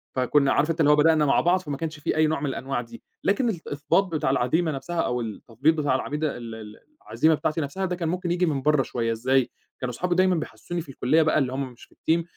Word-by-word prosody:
فكنا 135 +2 +3
عارف 150 +3 +2
أنت 165 - -4
اللي 150 -2 +5
هو - - +6
بدأنا 155 0 +4
مع 140 - +3
بعض، 180 +2 +3
فما 145 -6 -5
كانش 155 0 -5
في - - -1
أي 155 0 +4
نوع 155 -1 -1
من 145 - -3
الأنواع 135 -1 -3
دي، 115 -1 -12 0.2
لكن 235 +4 +2
الإثباط 160 -2 0
بتاع 160 -7 -1
العزيمة 140 +6 +1
نَفْسها 150 +5 -3
أو 125 0 -1
التثبيط 115 +6 0
بتاع 145 -4 +1
العميدة 150 +2 -2
ال 115 -2 -7
ال 105 -1 -10 0.3
العزيمة 160 0 +3
بتاعتي 155 +2 -1
نَفْسها، 155 +7 -3
ده 180 -1 -2
كان 170 -2 -2
ممكن 180 0 -2
ييجي 180 +1 +2
من 145 -5 -1
برّه 150 0 +3
شويّة 115 -2 -2
إزاي، 125 +3 +1 0.3
كانوا 125 -1 -3
أصحابي 180 +7 -1
دايمًا 185 0 +3
بيحسسوني 175 +1 -5
في 155 - -13
الكلية 135 +4 +2
بقى 155 0 +2
اللي 130 -2 -1
هُم 135 -1 -3
مش 120 - -17
في - - -27
الTeam 165 +1 +1
150 Hz, 245 wpm, -25 LUFS, 130-165 Hz, 0.3 s, هو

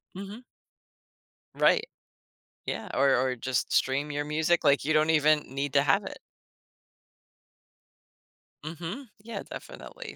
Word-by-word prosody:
Mhm. 200 +5 -8 1.1
Right. 450 -1 +3 0.8
Yeah, - - -4
or 135 0 +4
or 130 0 +1
just 125 +1 -2
stream 140 +3 +1
your 145 0 -2
music 160 +3 +1
like 140 -2 +4
you 155 +2 +1
don't 155 +1 +3
even 155 0 +4
need 140 +1 -2
to 140 0 +4
have 135 - +3
it. - - -7 2.5
Mhm, 170 - -6
yeah, 230 +1 -6
definitely, - - -9
150 Hz, 120 wpm, -28 LUFS, 140-170 Hz, 2.5 s, or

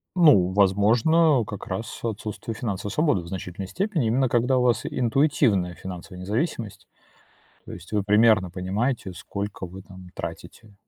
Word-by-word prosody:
Ну, 140 - +5
возможно, 115 - +3
как 105 - -7
раз 105 +5 -5
отсутствие 110 0 -4
финансовой 100 -3 -4
свободы 145 - +1
в 85 - -11
значительной 95 +1 -6
степени, 170 - -1
именно 130 +3 +2
когда 125 +2 +2
у - - +2
вас 125 -1 +1
интуитивная 120 - +1
финансовая 90 0 -9
независимость. 110 - -3 0.8
То - - -9
есть - - -11
вы 105 -1 +1
примерно 105 -2 +4
понимаете, 95 +4 -2
сколько 100 +3 -6
вы 95 +2 -10
там 95 -1 -13
тратите. 85 +5 -8
105 Hz, 145 wpm, -24 LUFS, 95-125 Hz, 0.8 s, Ну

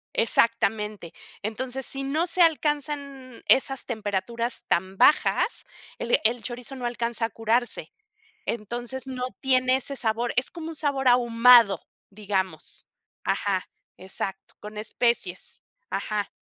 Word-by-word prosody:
Exactamente, 215 -5 +1 0.3
entonces 250 +5 -3
si 275 - 0
no 300 +5 0
se 360 0 +2
alcanzan 290 -5 -1
esas 270 0 +4
temperaturas 225 +1 -3
tan 190 +2 0
bajas, 300 - +3 0.3
el 235 - +2
el 235 +1 +4
chorizo 250 +3 -7
no 250 -2 -4
alcanza 235 -1 -1
a - - -11
curarse, 225 +2 -1 0.5
entonces 240 +4 -4
no 255 -1 -3
tiene 255 -1 +3
ese 275 +1 -1
sabor, 235 -1 0
es 250 - +2
como 330 -2 -7
un 325 - -7
sabor 280 -3 -1
ahumado 240 -3 +6 0.3
digamos. 195 -2 -4 0.4
Ajá, 195 -2 -1 0.3
exacto, 190 +1 -6
con 210 0 -9
especies. 215 -3 -2 0.3
Ajá. 210 -2 -2
240 Hz, 120 wpm, -25 LUFS, 215-265 Hz, 0.5 s, ahumado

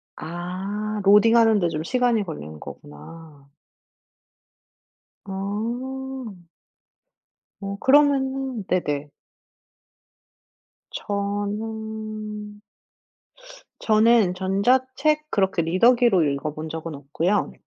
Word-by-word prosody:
아. 195 +5 -4
로딩하는데 210 -2 +5
좀 155 -1 -3
시간이 245 -1 +1
걸리는 80 - -8
거구나. 140 - -12 1.8
아. 225 +1 -5 1.1
어 200 0 -5
그러면은 270 -4 +2
네네. 145 -5 -1 1.8
저는 210 +1 -4 1.2
저는 220 -3 +4
전자책 260 +10 +1
그렇게 190 -3 +1
리더기로 195 +2 +4
읽어본 150 +2 -3
적은 160 -1 -6
없고요. 165 +8 -1
205 Hz, 155 characters per minute, -23 LUFS, 175-235 Hz, 1.8 s, 로딩하는데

